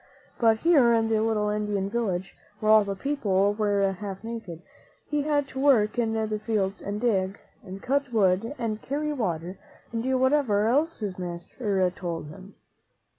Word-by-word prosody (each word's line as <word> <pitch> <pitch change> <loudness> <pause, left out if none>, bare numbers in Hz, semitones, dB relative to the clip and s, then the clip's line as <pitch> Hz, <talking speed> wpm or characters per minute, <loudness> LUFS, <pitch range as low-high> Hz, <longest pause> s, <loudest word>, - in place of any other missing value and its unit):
But 225 -2 +3
here 275 -9 +5
in 225 0 +1
the 220 -1 +2
little 215 -2 +1
Indian 210 -2 -1
village, 195 -4 -2 0.2
where 215 0 +2
all 215 -1 +7
the 200 -1 -3
people 205 -5 +1
were 205 -2 +1
half 195 +1 -7
naked, 225 -8 -7 0.4
he 295 -1 0
had 290 -1 0
to 265 - -6
work 245 -6 +3
in 225 -2 +1
the 215 -1 -1
fields 205 -3 -1
and 205 +1 -4
dig, 195 -5 0 0.3
and 190 +1 -9
cut 280 0 0
wood 205 +3 +2
and 220 -3 -3
carry 300 +2 -2
water, 180 - -3 0.3
and 230 - -1
do 260 +2 +1
whatever 260 -6 +2
else 300 +3 +1
his 195 -3 -4
master 185 +3 -2
told 170 -5 -5
him. 185 +6 -13
215 Hz, 170 wpm, -26 LUFS, 195-240 Hz, 0.4 s, all